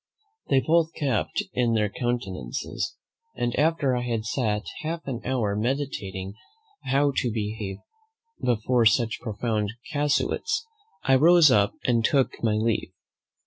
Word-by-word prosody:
They 135 - +4
both 165 0 +2
kept 135 -8 -1
their 115 -4 +2
countenances, 100 - -3 0.4
and 120 -1 -1
after 150 -3 +2
I 125 - -1
had 115 -3 -2
sat 110 -3 -1 0.2
half 165 +2 -4
an 125 -4 -4
hour 115 -6 0
meditating 105 -6 -3 0.5
how 140 +2 +2
to 120 - +1
behave 105 -2 -3 0.7
before 120 0 +3
such 115 +1 +2
profound 110 -1 -2 0.2
casuists, 300 - 0 0.4
I 135 - +3
rose 160 +2 +7
up 100 -3 +3
and 120 -2 +2
took 135 +2 +3
my 110 -2 +2
leave. 110 -3 -1
120 Hz, 125 wpm, -26 LUFS, 110-140 Hz, 0.7 s, rose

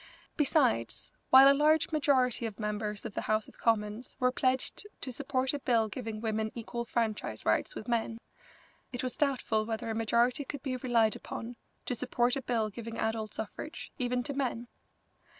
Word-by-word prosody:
Besides, 265 - +1 0.2
while 265 +1 +10
a 275 - +8
large 305 +3 +3
majority 260 -6 +2
of 215 -1 -9
members 210 -1 -3
of - - -5
the - - -2
House 215 0 0
of - - -17
Commons 215 +1 0
were 250 0 +3
pledged 260 +10 0
to 260 - -5
support 265 0 -1
a 290 - -2
bill 230 -5 +2
giving 225 -1 -5
women 220 -1 -1
equal 235 0 -4
franchise 220 - -2
rights 110 - +1
with 215 - -7
men, 230 -1 0 0.7
it 245 -1 -4
was 255 - -2
doubtful 255 -6 +1
whether 225 0 -3
a - - -1
majority 235 +4 +2
could 280 0 -6
be 265 -3 -2
relied 235 -3 +2
upon 235 +2 -6 0.3
to - - -1
support 245 0 +1
a 275 - -2
bill 230 -4 0
giving 230 +1 -7
adult 220 -1 -2
suffrage, 220 +8 -6
even 250 0 0
to 280 - -3
men. 250 -3 -2
235 Hz, 175 wpm, -31 LUFS, 220-260 Hz, 0.7 s, while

